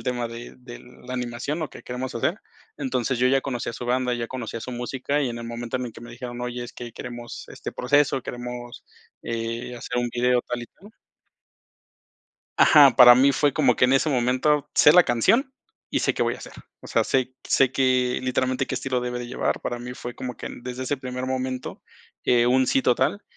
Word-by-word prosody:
El - - -10
tema 120 -2 -2
de 115 +1 -9
de 125 -1 -10 0.3
la 125 - -4
animación, 125 +5 -3
lo 150 -5 -3
que - - -12
queremos 125 +1 -5
hacer. 160 - -1 0.4
Entonces, 130 -2 -1
yo 125 +1 +3
ya 135 0 +3
conocía 120 -3 -3
su 120 - -7
banda, 125 0 +1
ya 120 -1 -3
conocía 115 -3 -5
su 125 - -6
música, 135 +4 -2
y 130 - 0
en 120 - -5
el 115 - -7
momento 120 +1 -4
en 125 - -3
el 115 - -9
que - - -12
me 120 0 -10
dijeron: 120 0 -7
"Oye, 125 0 -4
es 120 - -10
que 120 -2 -8
queremos 120 -1 -8
este - - -7
proceso, 135 0 +2
queremos, 120 0 -7 0.4
eh, 115 +1 -4
hacer 125 +1 -4
un 120 0 0
video 125 0 +3
tal 120 0 -3
y - - -8
tal". 205 - -18 1.7
Ajá, 140 -5 +7
para 125 -1 +10
mí 135 +3 +5
fue 145 -2 +2
como 135 -7 +3
que 125 - +4
en 130 - +2
ese 145 +3 +3
momento 135 +3 +1
sé 150 - +7
la 180 +1 +7
canción, 235 - +2 0.4
y - - +1
sé - - +1
qué - - +1
voy - - 0
a - - -9
hacer. - - -11 0.3
O - - -11
sea, - - +2
sé 130 -1 0
sé 130 -1 +3
que 130 -2 +2
literalmente 130 +1 0
qué - - -5
estilo 130 -1 -1
debe 125 0 -3
de 120 - -6
llevar. 125 - -2
Para 120 0 -3
mí 125 +1 -7
fue 120 0 -7
como 125 -1 -6
que - - -7
desde 125 0 -5
ese 140 +2 -1
primer 125 -1 -5
momento, 130 0 -4 0.4
eh, 120 -1 +4
un 130 +1 +4
sí 135 - +3
total 130 +11 +1
125 Hz, 220 wpm, -24 LUFS, 120-130 Hz, 1.7 s, para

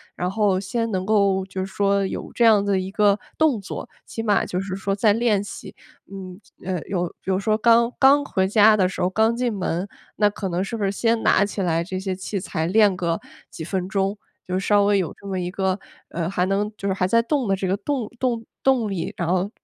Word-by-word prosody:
然 180 - -2
后 195 -1 +1
先 230 +4 -2
能 185 -2 -2
够 200 -2 +2
就 190 0 -5
是 - - -8
说 200 0 +1
有 - - -5
这 240 - +1
样 215 -3 +5
子 195 -2 +1
一 185 +1 -6
个 205 0 +3 0.2
动 295 -9 +2
作， 195 - -7 0.2
起 225 - -5
码 210 -3 +2
就 180 - -3
是 190 -1 -4
说 195 0 -2
在 205 +1 +3
练 225 -3 +2
习。 205 - -9 0.4
嗯， 185 -2 -8 0.3
呃， 185 -3 -2
有 180 -3 -1 0.2
比 190 - -2
如 190 - +1
说 215 +2 +1
刚 235 +1 +4
刚 280 +2 +5
回 190 -7 0
家 210 +2 +5
的 185 -3 +2
时 - - -8
候 180 - +2
刚 220 +4 +2
进 240 -1 -1
门， 185 -1 -2 0.3
那 210 -1 +4
可 200 -1 -5
能 175 +1 -1
是 195 +4 -3
不 215 - -3
是 195 - +1
先 225 +2 0
拿 205 - +4
起 205 0 -4
来 170 -2 0
这 185 +1 -4
些 190 0 -3
器 190 +2 -5
材 165 -4 -2
练 205 0 +4
个 170 -2 -1 0.3
几 160 - -8
分 185 +2 -3
钟， 195 0 -1 0.3
就 185 +1 -1
稍 205 +1 +3
微 200 0 +3
有 185 -4 -2
这 - - -19
么 190 -2 -3
一 175 0 -3
个 190 +1 -1 0.3
呃， 170 -1 -3
还 180 -1 0
能 200 +2 0
就 200 - -3
是 - - +1
还 185 -1 0
在 230 +4 +4
动 260 0 -1
的 195 - +2
这 190 - -3
个 190 +1 0
动 255 -3 -3
动 240 -3 -1 0.2
动 255 -5 +2
力， 190 -4 -3
然 170 - -2
后 185 +2 +1
195 Hz, 255 characters per minute, -23 LUFS, 185-215 Hz, 0.4 s, 样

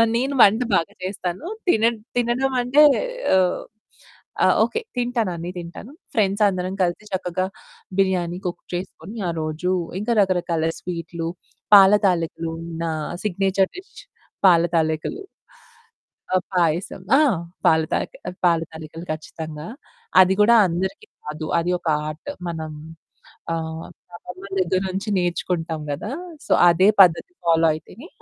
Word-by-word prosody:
నేను 265 +4 0
వంట 220 +4 +5
బాగా 165 - -1
చేస్తాను 185 - -4 0.2
తిన 220 -9 +3 0.3
తినడమంటే 250 +3 +2 0.5
ఆహ్, 185 -1 +2 0.8
ఆ! - - +6 0.2
ఓకె 455 - -2 0.2
తింటాను 240 -4 0
అన్ని 170 +1 -5
తింటాను. 175 +9 -9 0.2
ఫ్రెండ్స్ 205 -1 +1
అందరం 185 -1 -2
కలిసి 175 +3 -1
చక్కగా 185 0 -1 0.5
బిర్యానీ 180 -2 +1
కుక్ 175 -1 -4
చేసుకొని 190 +4 -6
ఆ - - +1
రోజు 155 +4 -2 0.3
ఇంక 215 +3 -3
రకరకాల 175 -4 +1
స్వీట్లు, 170 -1 -5 0.5
పాల 195 0 +9
తాలికలు 165 -2 -1 0.3
నా 165 - -1 0.3
సిగ్నేచర్ 195 -1 +1
డిష్ 370 +2 -12 0.5
పాల 170 -3 +6
తాలికలు. 160 - 0 1.1
ఆ! - - +5 0.2
పాయసం. 175 +2 0 0.2
ఆ! - - +5 0.5
పాల 160 0 +5
తాయి - - -1 0.4
పాల 170 -2 +4
తాలికలు 160 +1 -9
ఖచ్చితంగా. 155 0 -8 0.5
అది 190 +1 +4
కూడా 235 +3 +6
అందరికి 190 - -3 0.2
కాదు, 155 +1 -5
అది 170 +2 -1
ఒక 170 - -8 0.2
ఆర్ట్. 155 - -7 0.2
మనం 160 -2 -5 0.8
ఆహ్, 160 0 -4 0.3
అమ్మమ్మ 180 +2 -11 0.2
దగ్గర 185 +1 +1
నుంచి 195 +3 -4
నేర్చుకుంటాం 170 -2 -2
గదా. 205 - -5 0.3
సో, - - -1 0.2
అదే 185 +4 +4
పద్ధతి 180 - +2
ఫాలో 165 0 +4
అయితేనే 195 - -11
180 Hz, 125 wpm, -22 LUFS, 165-200 Hz, 1.1 s, పాల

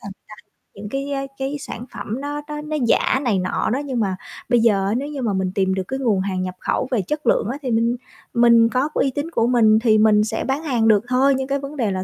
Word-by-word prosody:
là 200 - -7
người - - -53 0.3
ta - - -51 0.2
những, 205 +1 -8
cái, 275 +3 -4
á, 275 -1 -1 0.2
cái 270 +2 -3
sản 240 -3 -7
phẩm 230 +6 -5
nó 290 +1 -4
nó 300 0 -5
nó 305 0 -3
giả 265 - +2
này 215 -7 +1
nọ 185 - -1
đó, 265 - 0
nhưng 260 -4 -2
mà 195 -4 0 0.3
bây 240 -1 +4
giờ 210 -4 +3
á 200 - 0
nếu 275 +3 -3
như 290 -2 -5
mà 225 -5 0
mình 190 -1 -1
tìm 190 -1 +1
được 190 0 -2
cái 265 - -3
nguồn 225 -7 +1
hàng 190 -1 -2
nhập 185 0 -5
khẩu 255 - -1
về 240 -5 +1
chất 300 - -4
lượng - - +2
á, 270 - -5
thì 260 -4 -3
mình 230 +1 +2 0.4
mình 235 -1 +5
có 255 +5 0
cái - - +1
uy 270 - 0
tín 290 +5 -4
của 230 -5 +1
mình 220 -3 +4
thì 220 -2 +3
mình 215 -1 +4
sẽ 220 +1 -2
bán 270 +4 -1
hàng 245 -7 +1
được 215 -1 +4
thôi. 260 +2 +3
Nhưng 265 0 -3
cái 280 +1 -1
vấn 280 +2 -7
đề 225 -6 0
là 185 0 -2
235 Hz, 285 wpm, -21 LUFS, 210-275 Hz, 0.4 s, mình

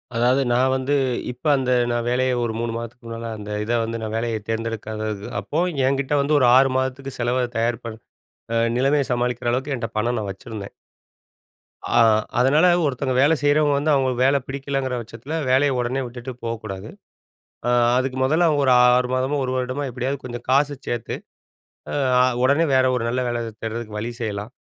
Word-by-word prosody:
அதாவது 125 +3 +3
நான் 130 +2 +3
வந்து, 130 +2 -1 0.4
இப்ப 125 +4 -16
அந்த 130 -1 -1 0.2
நான் 120 0 -1
வேலைய 130 +1 +1
ஒரு 115 -2 -2
3 115 0 -2
மாதத்துக்கு 115 +1 -7
முன்னால, 115 0 -5
அந்த 105 0 -8
இத 110 - -3
வந்து 115 0 -4
நான் 110 -1 -4
வேலைய 115 -1 -1
தேர்ந்தெடுக்காதது 110 -2 -3 0.2
அப்போ 145 - -2 0.3
என்கிட்ட 140 +1 0
வந்து 150 +2 +1
ஒரு 125 - +4
6 135 0 +5
மாதத்துக்கு 130 +1 -3
செலவ 125 +1 +1
தயார் 115 +1 0
பண் 110 -1 -6 0.6
ஆ - - +1 0.2
நிலைமைய 135 +2 +2
சமாளிக்கிற 120 0 -1
அளவுக்கு, 135 +3 -1
என்ட்ட 115 -2 -4
பணம் 120 +2 0
நான் 105 -2 -3
வச்சிருந்தேன். 100 +1 -9 1.1
ஆ - - 0 0.4
அதனால, 145 +8 +4 0.2
ஒருத்தவங்க 130 -1 -1
வேலை 150 +4 +4
செய்றவங்க 145 0 +3
வந்து 150 +2 +1
அவுங்க 135 -2 +2
வேலை 140 +1 +4
பிடிக்கலங்கிற 135 -1 -2
பட்சத்தில, 115 +6 -9 0.2
வேலைய 135 +1 +3
உடனே 125 +2 -1
விட்டுட்டு 120 +1 -7
போகக்கூடாது. 110 -4 -5 0.8
ஆ - - +2 0.3
அதுக்கு 130 0 -1
மொதல்ல, 160 +6 +3
அவுங்க 150 -3 +2
ஒரு 130 - +5 0.2
6 125 0 +2
மாதமோ, 130 +3 0
1 130 - -2
வருடமோ, 130 +2 -2
எப்படியாவது 130 +3 -3
கொஞ்சம் 120 -1 -7
காச 140 +2 +4 0.2
சேத்து, 120 -2 -3 0.8
ஆ - - -4 0.3
அ - - +5 0.2
உடனே 140 +6 +4
வேற 130 0 +4
ஒரு 125 - -1
நல்ல 125 +2 -1
வேல 120 -1 -2 0.2
தேடுறதுக்கு 110 -1 -5
வழி 115 +3 -4
செய்யலாம். 105 0 -4
125 Hz, 175 wpm, -22 LUFS, 115-135 Hz, 1.1 s, 6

